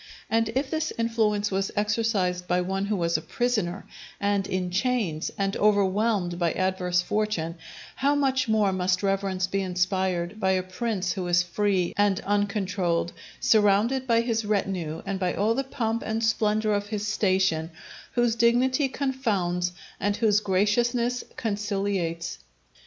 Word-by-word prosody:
And 225 Hz, 0 st, +2 dB
if 270 Hz, +1 st, -1 dB
this 315 Hz, -1 st, -1 dB
influence 220 Hz, -3 st, +1 dB
was 195 Hz, 0 st, 0 dB
exercised 205 Hz, -4 st, 0 dB
by 180 Hz, +1 st, +2 dB
one 190 Hz, +2 st, -2 dB
who 210 Hz, +1 st, 0 dB
was 170 Hz, -3 st, +1 dB
a -, -, -5 dB
prisoner, 210 Hz, -5 st, -1 dB, 0.3 s
and 200 Hz, -1 st, 0 dB
in 180 Hz, -1 st, -2 dB
chains, 200 Hz, -6 st, 0 dB
and 195 Hz, 0 st, 0 dB
overwhelmed 200 Hz, -3 st, +2 dB
by 170 Hz, -2 st, +1 dB
adverse 180 Hz, -1 st, 0 dB
fortune, 180 Hz, -6 st, -2 dB, 0.4 s
how 280 Hz, +2 st, +2 dB
much 265 Hz, -2 st, +1 dB
more 210 Hz, -3 st, +3 dB
must 185 Hz, +1 st, 0 dB
reverence 195 Hz, -1 st, 0 dB
be 195 Hz, +2 st, -1 dB
inspired 185 Hz, +1 st, -1 dB
by 190 Hz, -2 st, +2 dB
a 185 Hz, -1 st, 0 dB
prince 190 Hz, -1 st, -2 dB
who 185 Hz, -3 st, -3 dB
is 175 Hz, 0 st, +3 dB
free 185 Hz, 0 st, 0 dB
and 200 Hz, -1 st, +2 dB
uncontrolled, 195 Hz, -4 st, 0 dB, 0.3 s
surrounded 220 Hz, +5 st, +3 dB
by 230 Hz, -1 st, +4 dB
his 230 Hz, -1 st, -1 dB
retinue 190 Hz, -6 st, -2 dB
and 195 Hz, -1 st, -3 dB
by 180 Hz, -2 st, 0 dB
all 215 Hz, +3 st, +2 dB
the 270 Hz, +3 st, -1 dB
pomp 230 Hz, -3 st, -2 dB
and 220 Hz, +1 st, -2 dB
splendour 215 Hz, -1 st, +1 dB
of 205 Hz, 0 st, -1 dB
his 210 Hz, -1 st, -3 dB
station; 190 Hz, -6 st, +1 dB, 0.4 s
whose 240 Hz, -2 st, +2 dB
dignity 255 Hz, +4 st, +3 dB
confounds, 205 Hz, -11 st, -1 dB, 0.3 s
and 205 Hz, 0 st, 0 dB
whose 210 Hz, -2 st, +3 dB
graciousness 235 Hz, +5 st, +1 dB
conciliates. 200 Hz, -6 st, -2 dB
205 Hz, 145 wpm, -26 LUFS, 185-225 Hz, 0.4 s, by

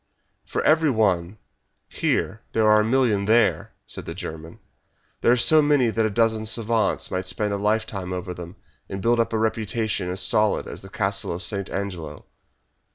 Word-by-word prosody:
"For -, -, -3 dB
every 155 Hz, 0 st, +4 dB
one 100 Hz, -5 st, +1 dB, 0.5 s
here 105 Hz, +3 st, -1 dB
there 110 Hz, -1 st, +2 dB
are 105 Hz, 0 st, +6 dB
a -, -, +3 dB
million 110 Hz, -4 st, +2 dB
there!" 110 Hz, +1 st, +2 dB
said -, -, -7 dB
the 85 Hz, -, -6 dB
German. 80 Hz, -3 st, -8 dB, 0.6 s
"There -, -, +4 dB
are 125 Hz, -, +4 dB
so 155 Hz, +6 st, +6 dB
many 145 Hz, -5 st, +3 dB
that 110 Hz, 0 st, +1 dB
a -, -, -2 dB
dozen 110 Hz, 0 st, +1 dB
savants 115 Hz, 0 st, +1 dB
might 95 Hz, 0 st, -3 dB
spend 100 Hz, +3 st, -1 dB
a -, -, -1 dB
lifetime 105 Hz, -2 st, -1 dB
over 90 Hz, 0 st, -4 dB
them, 85 Hz, 0 st, -9 dB, 0.3 s
and 95 Hz, -, -5 dB
build 115 Hz, +4 st, +2 dB
up 115 Hz, -, +1 dB
a 110 Hz, -, 0 dB
reputation 110 Hz, -3 st, -1 dB
as 90 Hz, +1 st, -2 dB
solid 105 Hz, 0 st, +2 dB
as -, -, -8 dB
the 95 Hz, -, -12 dB
Castle 100 Hz, 0 st, -2 dB
of 85 Hz, +3 st, -5 dB
St. 100 Hz, -2 st, -2 dB
Angelo." 85 Hz, -7 st, -5 dB
105 Hz, 180 wpm, -23 LUFS, 95-115 Hz, 0.6 s, are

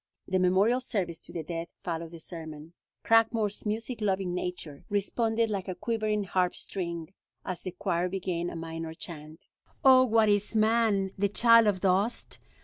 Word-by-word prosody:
The 185 Hz, 0 st, +1 dB
memorial 190 Hz, +7 st, +3 dB
service 190 Hz, -10 st, -3 dB
to -, -, -15 dB
the 165 Hz, -, -4 dB
dead 165 Hz, +1 st, -5 dB, 0.2 s
followed 165 Hz, -1 st, -4 dB
the 165 Hz, 0 st, -11 dB
sermon. 160 Hz, -1 st, -8 dB, 0.3 s
Cragmore's 225 Hz, -2 st, +2 dB
music 225 Hz, +2 st, -3 dB
loving 190 Hz, -3 st, 0 dB
nature 180 Hz, -5 st, -5 dB
responded 225 Hz, +2 st, 0 dB
like 195 Hz, -2 st, -3 dB
a 185 Hz, -, -3 dB
quivering 215 Hz, -2 st, -1 dB
harp 180 Hz, -1 st, 0 dB
string 170 Hz, -2 st, -5 dB, 0.3 s
as 185 Hz, -2 st, -4 dB
the -, -, -4 dB
choir 175 Hz, 0 st, -1 dB
began 175 Hz, -2 st, -2 dB
a -, -, -8 dB
minor 165 Hz, 0 st, -6 dB
chant: 155 Hz, -1 st, -9 dB, 0.4 s
"Oh 260 Hz, -1 st, +8 dB
what 225 Hz, -3 st, +3 dB
is 205 Hz, +1 st, +1 dB
man, 215 Hz, -3 st, +2 dB
the 200 Hz, 0 st, +2 dB
child 230 Hz, +1 st, +6 dB
of 190 Hz, -3 st, +1 dB
dust? 195 Hz, +5 st, 0 dB
190 Hz, 160 wpm, -29 LUFS, 170-220 Hz, 0.4 s, Oh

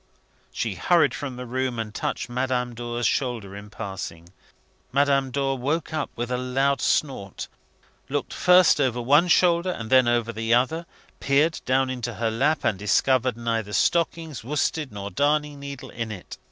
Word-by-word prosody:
She -, -, -2 dB
hurried 160 Hz, -8 st, +3 dB
from 135 Hz, -2 st, -5 dB
the 125 Hz, 0 st, -7 dB
room, 130 Hz, 0 st, -2 dB
and 110 Hz, -2 st, -4 dB
touched 120 Hz, -, -3 dB
Madame 125 Hz, 0 st, -1 dB
Dor's 120 Hz, 0 st, -4 dB
shoulder 115 Hz, -7 st, -1 dB
in 105 Hz, +1 st, -9 dB
passing. 95 Hz, -5 st, -7 dB, 0.6 s
Madame 140 Hz, 0 st, +2 dB
Dor 135 Hz, 0 st, -1 dB
woke 150 Hz, +5 st, -2 dB
up 155 Hz, -2 st, -2 dB
with 120 Hz, +1 st, -4 dB
a 125 Hz, -, 0 dB
loud 135 Hz, +2 st, 0 dB
snort, 115 Hz, -10 st, -1 dB, 0.6 s
looked -, -, -2 dB
first 180 Hz, -4 st, +5 dB
over 125 Hz, -3 st, +1 dB
one 145 Hz, +8 st, +4 dB
shoulder 175 Hz, 0 st, +3 dB
and 115 Hz, -10 st, -5 dB
then 130 Hz, -2 st, +6 dB
over 120 Hz, -1 st, +1 dB
the 115 Hz, +1 st, +1 dB
other, 160 Hz, +7 st, 0 dB, 0.3 s
peered 150 Hz, +4 st, +2 dB
down 130 Hz, 0 st, +2 dB
into 120 Hz, -3 st, -4 dB
her 115 Hz, 0 st, -1 dB
lap, 140 Hz, +8 st, +1 dB
and 100 Hz, -, 0 dB
discovered 125 Hz, +3 st, +2 dB
neither 115 Hz, -3 st, -2 dB
stockings, 165 Hz, -, 0 dB
worsted, 150 Hz, +2 st, -1 dB
nor 100 Hz, -1 st, -6 dB
darning 145 Hz, 0 st, 0 dB
needle 140 Hz, -1 st, -8 dB
in 115 Hz, -1 st, -4 dB
it. 95 Hz, -4 st, -9 dB
130 Hz, 165 wpm, -24 LUFS, 115-145 Hz, 0.6 s, then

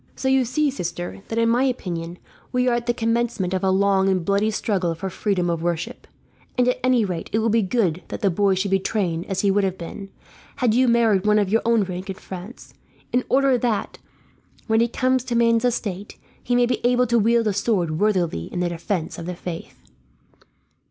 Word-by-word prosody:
"So 265 Hz, -, -3 dB
you 265 Hz, -1 st, +3 dB
see, 285 Hz, +4 st, +1 dB
sister, 175 Hz, -6 st, -5 dB
that 225 Hz, -, -4 dB
in 230 Hz, 0 st, +3 dB
my 240 Hz, +3 st, +3 dB
opinion 175 Hz, -9 st, -3 dB, 0.3 s
we 250 Hz, 0 st, +1 dB
are 245 Hz, -, +3 dB
at 240 Hz, 0 st, -2 dB
the -, -, +4 dB
commencement 230 Hz, -5 st, 0 dB
of 185 Hz, 0 st, -1 dB
a 190 Hz, -, +3 dB
long 195 Hz, 0 st, +3 dB
and 185 Hz, -3 st, 0 dB
bloody 200 Hz, +3 st, +2 dB
struggle 190 Hz, -5 st, -1 dB
for 190 Hz, +4 st, -5 dB
freedom 185 Hz, -2 st, -1 dB
of 170 Hz, -1 st, -1 dB
worship; 170 Hz, -1 st, -3 dB, 0.5 s
and 250 Hz, 0 st, +3 dB
at 250 Hz, -, +1 dB
any 255 Hz, -3 st, +3 dB
rate 180 Hz, -4 st, -4 dB
it -, -, +1 dB
will 225 Hz, +1 st, +1 dB
be 225 Hz, +1 st, +3 dB
good 185 Hz, -4 st, 0 dB
that -, -, -6 dB
the 195 Hz, -, +2 dB
boy 195 Hz, +2 st, +2 dB
should 190 Hz, +1 st, -1 dB
be 195 Hz, -, +3 dB
trained 180 Hz, -5 st, -2 dB
as 190 Hz, -1 st, -1 dB
he 200 Hz, -, +3 dB
would 200 Hz, +1 st, +2 dB
have 190 Hz, -1 st, -1 dB
been, 195 Hz, +4 st, -8 dB, 0.5 s
had 245 Hz, -4 st, +1 dB
you 255 Hz, +2 st, +3 dB
married 225 Hz, -4 st, +3 dB
one 210 Hz, 0 st, +4 dB
of 205 Hz, -3 st, +1 dB
your 225 Hz, +3 st, +2 dB
own 230 Hz, -2 st, +3 dB
rank 185 Hz, +1 st, -6 dB
in 190 Hz, -, -3 dB
France; 190 Hz, +5 st, -10 dB, 0.4 s
in 250 Hz, +1 st, +2 dB
order 265 Hz, -1 st, +3 dB
that, 230 Hz, -3 st, -2 dB, 0.7 s
when 220 Hz, 0 st, +2 dB
he 235 Hz, -, +3 dB
comes 255 Hz, +1 st, +1 dB
to 240 Hz, -, -2 dB
man's 230 Hz, 0 st, +3 dB
estate, 205 Hz, -5 st, -3 dB, 0.2 s
he 245 Hz, -, 0 dB
may 245 Hz, 0 st, +4 dB
be 245 Hz, -, -2 dB
able 250 Hz, +1 st, +3 dB
to 235 Hz, 0 st, +2 dB
wield 230 Hz, +2 st, +3 dB
a 210 Hz, -, +1 dB
sword 185 Hz, -6 st, 0 dB
worthily 180 Hz, -, +1 dB
in -, -, -3 dB
the 180 Hz, -1 st, 0 dB
defence 170 Hz, 0 st, -3 dB
of 170 Hz, -, -7 dB
the 180 Hz, -, -4 dB
faith. 170 Hz, -1 st, -8 dB
205 Hz, 220 wpm, -22 LUFS, 185-235 Hz, 0.7 s, the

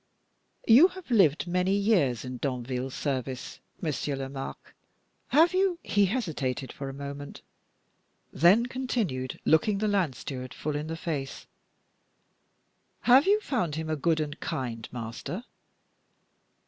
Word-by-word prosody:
You 255 Hz, +10 st, +8 dB
have 375 Hz, -6 st, -11 dB
lived 180 Hz, -10 st, +4 dB
many 180 Hz, +2 st, +1 dB
years 175 Hz, -, +2 dB
in 125 Hz, 0 st, -5 dB
Danville's 125 Hz, 0 st, -3 dB
service, 130 Hz, -2 st, -3 dB, 0.2 s
Monsieur 150 Hz, -3 st, -2 dB
Lomaque; 135 Hz, 0 st, -7 dB, 0.5 s
have 325 Hz, +6 st, +5 dB
you" 375 Hz, -1 st, +2 dB
he 200 Hz, -1 st, +3 dB
hesitated 150 Hz, -, -2 dB
for 135 Hz, -1 st, -6 dB
a -, -, -4 dB
moment, 140 Hz, +1 st, -8 dB, 0.9 s
then 190 Hz, -, +5 dB
continued, 230 Hz, -, -2 dB
looking 195 Hz, +6 st, +3 dB
the 215 Hz, +2 st, 0 dB
land 190 Hz, -10 st, +1 dB
steward 130 Hz, -1 st, -6 dB
full 150 Hz, -1 st, -3 dB
in 150 Hz, +1 st, -3 dB
the 165 Hz, 0 st, -4 dB
face 145 Hz, -5 st, -4 dB, 1.6 s
"have 255 Hz, -, +6 dB
you 415 Hz, +2 st, +5 dB
found 220 Hz, -, -1 dB
him 160 Hz, 0 st, -3 dB
a -, -, +1 dB
good 160 Hz, +2 st, +1 dB
and 150 Hz, 0 st, -3 dB
kind 115 Hz, -4 st, -4 dB
master?" 120 Hz, -, -5 dB
155 Hz, 130 wpm, -28 LUFS, 135-210 Hz, 1.6 s, You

